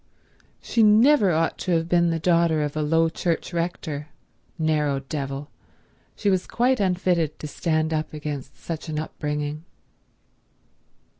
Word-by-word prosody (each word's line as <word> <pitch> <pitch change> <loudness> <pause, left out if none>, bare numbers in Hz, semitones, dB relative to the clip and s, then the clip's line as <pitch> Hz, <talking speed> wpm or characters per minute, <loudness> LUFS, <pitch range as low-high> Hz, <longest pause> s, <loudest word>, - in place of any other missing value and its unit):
She 230 - +1
never 220 +1 +6
ought 165 -1 0
to 180 - -1
have 165 0 +1
been 170 0 +3
the 165 - 0
daughter 165 -2 +2
of 145 0 -3
a 155 - 0
low 165 +2 +3
church 170 +1 -2
rector—narrow 155 -2 -3
devil; 140 0 -5 0.6
she 205 - +1
was 185 -1 0
quite 250 +2 +1
unfitted 180 -5 +1
to - - -8
stand 155 +1 -1
up 155 0 -2
against 150 -3 -6
such 165 -1 -6
an 155 - -3
upbringing. 150 0 -3
160 Hz, 135 wpm, -24 LUFS, 150-175 Hz, 0.6 s, never